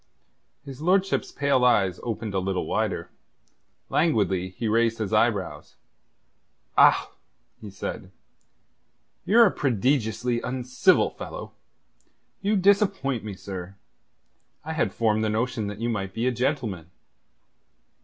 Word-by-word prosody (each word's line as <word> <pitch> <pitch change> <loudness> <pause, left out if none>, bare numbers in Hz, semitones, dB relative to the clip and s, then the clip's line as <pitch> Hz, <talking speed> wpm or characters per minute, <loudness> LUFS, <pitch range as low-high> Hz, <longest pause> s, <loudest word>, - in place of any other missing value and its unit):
His 135 0 -9
lordship's 190 +3 +1
pale 140 -3 +1
eyes 95 -7 +3
opened 115 -3 -4
a 95 - +1
little 95 0 -2
wider. - - -2 0.8
Languidly 100 - +1
he 110 +5 -4
raised 115 +1 +2
his 105 -4 -3
eyebrows. - - 0 1.0
"Ah!" - - +5 0.5
he 105 - -9
said. 95 -1 -6 1.2
"You're 225 +6 +6
a 200 - +3
prodigiously 120 -1 0
uncivil 125 0 +2
fellow. - - -8 0.9
You 205 +2 +1
disappoint 190 - +2
me, 105 -2 -6
sir. 95 -1 -8 0.9
I 160 - -3
had 160 - 0
formed 110 -1 +1
the 110 - +1
notion 115 0 -1
that 105 0 -6
you 115 - -1
might 95 -4 -3
be 115 +2 -1
a 130 - +2
gentleman." 120 - -2
115 Hz, 120 wpm, -25 LUFS, 100-140 Hz, 1.2 s, You're